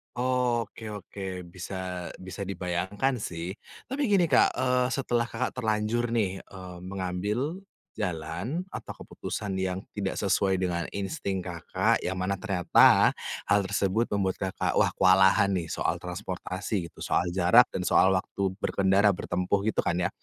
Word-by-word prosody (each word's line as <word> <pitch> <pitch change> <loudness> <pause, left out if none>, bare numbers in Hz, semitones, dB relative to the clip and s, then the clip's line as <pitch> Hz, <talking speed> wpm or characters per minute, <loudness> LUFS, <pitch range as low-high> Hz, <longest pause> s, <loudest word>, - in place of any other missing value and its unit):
Oke 120 -3 0
oke, 95 -2 -6
bisa 95 +1 -6 0.5
bisa 95 - -6
dibayangkan 95 +7 -1
sih. 85 -3 -4 0.4
Tapi 270 +3 -2
gini 195 -4 +4
Kak, 130 - +5
eee, 125 -1 +2
setelah 120 -3 0
Kakak 130 - -2
terlanjur 110 +1 0
nih, 95 -4 0
eee, 90 -2 -10
mengambil 100 - -3 0.4
jalan 90 - -3
atau - - -7
keputusan 100 -2 -4
yang 95 0 -1 0.2
tidak 100 -2 -1
sesuai 95 -1 +2
dengan 85 -2 -1
insting 100 - -3
Kakak. 85 -2 0
Yang 95 0 -2
mana 95 +2 0
ternyata 95 -4 +5 0.4
hal 105 - +5
tersebut 100 +3 +1
membuat 95 -2 0
Kakak, 95 -1 -1
wah - - +4
kewalahan 95 +1 +5
nih 85 -3 -1
soal - - -1
transportasi 90 0 -4
gitu, - - -16
soal 85 - +1
jarak 95 +7 +6
dan 90 - -2
soal 95 - +5
waktu 95 0 -1
berkendara, 100 +1 +3
bertempuh 90 +2 -1
gitu 110 - +1
kan 85 -1 +1
ya. 90 0 +1
95 Hz, 140 wpm, -28 LUFS, 90-110 Hz, 0.5 s, jarak